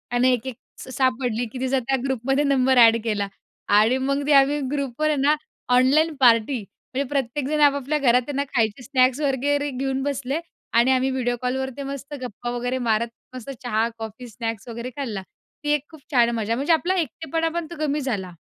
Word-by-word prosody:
आणि 255 Hz, +1 st, +4 dB
1-1 250 Hz, +1 st, -3 dB, 0.2 s
स -, -, -9 dB
सापडली 245 Hz, -2 st, +1 dB
की 255 Hz, -, -7 dB
तिचा 260 Hz, 0 st, +1 dB
त्या 265 Hz, +2 st, 0 dB
ग्रुपमध्ये 270 Hz, +2 st, 0 dB
नंबर 265 Hz, -2 st, +3 dB
एड 230 Hz, -1 st, +7 dB
केला 210 Hz, -3 st, -1 dB, 0.5 s
आणि 225 Hz, +5 st, +4 dB
मग 275 Hz, +2 st, 0 dB
ते 300 Hz, -, +4 dB
आम्ही 280 Hz, +1 st, +5 dB
ग्रुपमध्ये 290 Hz, +2 st, 0 dB
आहे 275 Hz, -, -1 dB
ना, 295 Hz, +2 st, +4 dB, 0.4 s
ऑनलाईन 300 Hz, +6 st, +4 dB
पार्टी. 240 Hz, 0 st, +4 dB
म्हणजे 255 Hz, +7 st, -6 dB
प्रत्येकजण 285 Hz, +2 st, -1 dB
आपापल्या 285 Hz, 0 st, +3 dB
घरात 250 Hz, -2 st, +4 dB
त्यांना 280 Hz, 0 st, -1 dB
खायचे 225 Hz, +1 st, +1 dB
स्नॅक्स 255 Hz, 0 st, +2 dB
वगैरे 285 Hz, +1 st, 0 dB
घेऊन 270 Hz, 0 st, -2 dB
बसले 280 Hz, +1 st, -2 dB, 0.3 s
आणि 235 Hz, +3 st, +4 dB
आम्ही 260 Hz, 0 st, +2 dB
व्हिडिओ 245 Hz, -2 st, 0 dB
कॉलवर 265 Hz, +1 st, -1 dB
ते 280 Hz, -, -4 dB
मस्त 275 Hz, +1 st, -7 dB
गप्पा 240 Hz, 0 st, -5 dB
वगैरे 245 Hz, +1 st, -2 dB
मारत, 230 Hz, -1 st, +1 dB, 0.3 s
मस्त 255 Hz, +1 st, -8 dB
चहा, 225 Hz, -1 st, +1 dB
कॉफी, 225 Hz, +2 st, -8 dB
स्नॅक्स 225 Hz, -1 st, -5 dB
वगैरे 235 Hz, +1 st, -5 dB
खाल्ला. 225 Hz, -9 st, -3 dB, 0.4 s
ती 295 Hz, -, 0 dB
एक 295 Hz, 0 st, -2 dB
खूप 315 Hz, -3 st, -14 dB
छान 240 Hz, -4 st, +4 dB
मजा. 225 Hz, 0 st, -1 dB
म्हणजे 285 Hz, +7 st, +2 dB
आपला 355 Hz, +4 st, +1 dB
एकटेपणा 325 Hz, +3 st, -2 dB
पण 330 Hz, -, -6 dB
तो -, -, -6 dB
कमी 295 Hz, +1 st, -1 dB
झाला. 195 Hz, -9 st, -3 dB
260 Hz, 185 wpm, -23 LUFS, 235-280 Hz, 0.5 s, एड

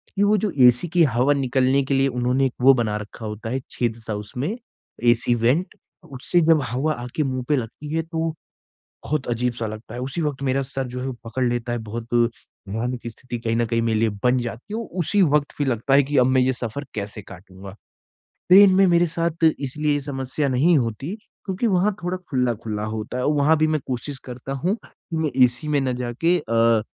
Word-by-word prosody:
कि 200 Hz, -, +2 dB
वो 210 Hz, +1 st, +4 dB
जो 210 Hz, 0 st, -1 dB, 0.2 s
एसी 125 Hz, +7 st, +3 dB
की 175 Hz, +1 st, +3 dB
हवा 130 Hz, 0 st, +3 dB
निकलने 135 Hz, 0 st, +2 dB
के 140 Hz, -, -2 dB
लिए 135 Hz, 0 st, +3 dB
उन्होंने 125 Hz, +1 st, +1 dB
एक 130 Hz, -, -1 dB
वो 135 Hz, +2 st, +8 dB
बना 115 Hz, -5 st, 0 dB
रखा 105 Hz, +2 st, -9 dB
होता 105 Hz, +1 st, -5 dB
है 130 Hz, +3 st, -1 dB
छेद-सा 115 Hz, -2 st, -3 dB
उसमें, 125 Hz, -, -4 dB, 0.5 s
एसी 120 Hz, 0 st, +3 dB
वेंट 125 Hz, +10 st, +1 dB, 0.4 s
उससे 135 Hz, +7 st, +1 dB
जब 160 Hz, -1 st, +4 dB
हवा 135 Hz, +6 st, 0 dB
आके 125 Hz, +4 st, -3 dB
मुँह 130 Hz, -2 st, -2 dB
पे 150 Hz, -, +4 dB
लगती 135 Hz, +4 st, -5 dB
है 165 Hz, -, +2 dB
तो 165 Hz, 0 st, -2 dB, 0.8 s
बहुत 150 Hz, -3 st, -2 dB
अजीब-सा 120 Hz, -1 st, -1 dB
लगता 110 Hz, +1 st, -8 dB
है 125 Hz, -, -5 dB
उसी 135 Hz, +6 st, -4 dB
वक़्त 145 Hz, -3 st, -2 dB
मेरा 135 Hz, 0 st, +1 dB
सर 135 Hz, 0 st, -4 dB
जो 125 Hz, +1 st, -5 dB
है 130 Hz, -, -4 dB
वो 135 Hz, -, -2 dB
पकड़ 115 Hz, +3 st, -2 dB
लेता 120 Hz, -1 st, -1 dB
है, 120 Hz, -, -1 dB
बहुत 115 Hz, +2 st, -6 dB, 0.5 s
भयानक 120 Hz, +4 st, -3 dB
स्थिति 120 Hz, +1 st, -7 dB
कहीं 115 Hz, -1 st, -1 dB
न 120 Hz, -, +2 dB
कहीं 115 Hz, +1 st, 0 dB
मेरे 115 Hz, -1 st, +1 dB
लिए 115 Hz, +1 st, +2 dB
बन 125 Hz, +1 st, +3 dB
जाती 120 Hz, -, -6 dB
है -, -, -1 dB
और 230 Hz, -, -6 dB
उसी 200 Hz, +5 st, +1 dB
वक्त 150 Hz, -3 st, +2 dB
फिर 145 Hz, -, 0 dB
लगता 130 Hz, +2 st, +1 dB
है 140 Hz, -, +7 dB
कि 145 Hz, +2 st, -2 dB
अब 125 Hz, -, +5 dB
मैं 130 Hz, 0 st, +3 dB
ये 130 Hz, +1 st, +2 dB
सफर 125 Hz, +3 st, -5 dB
कैसे 105 Hz, 0 st, -5 dB
काटूँगा। 95 Hz, +1 st, -12 dB, 0.8 s
ट्रेन 190 Hz, +1 st, +8 dB
में 195 Hz, +1 st, +5 dB
मेरे 175 Hz, -1 st, +4 dB
साथ 165 Hz, 0 st, -1 dB
इसलिए 150 Hz, +2 st, -1 dB
ये 145 Hz, -, 0 dB
समस्या 135 Hz, +1 st, -3 dB
नहीं 145 Hz, +7 st, +3 dB
होती 125 Hz, -, -3 dB, 0.3 s
क्योंकि 195 Hz, +4 st, -1 dB
वहाँ 200 Hz, 0 st, +2 dB
थोड़ा 180 Hz, +1 st, -2 dB
खुल्ला-खुल्ला 115 Hz, -5 st, -1 dB
होता 110 Hz, +3 st, -4 dB
है 125 Hz, -, -1 dB
और 150 Hz, -, +3 dB
वहाँ 145 Hz, +3 st, +4 dB
भी 155 Hz, -, +3 dB
मैं 155 Hz, -1 st, 0 dB
कोशिश 130 Hz, +2 st, -4 dB
करता 125 Hz, +1 st, -7 dB
हूँ 165 Hz, +9 st, 0 dB
कि 165 Hz, -, -10 dB
मैं 160 Hz, -2 st, 0 dB
एसी 120 Hz, +4 st, -1 dB
में 145 Hz, -1 st, +2 dB
ना 130 Hz, -1 st, 0 dB
जाके 130 Hz, +9 st, +1 dB
अ -, -, -7 dB
अ, 115 Hz, -1 st, +4 dB
130 Hz, 215 wpm, -23 LUFS, 120-150 Hz, 0.8 s, वो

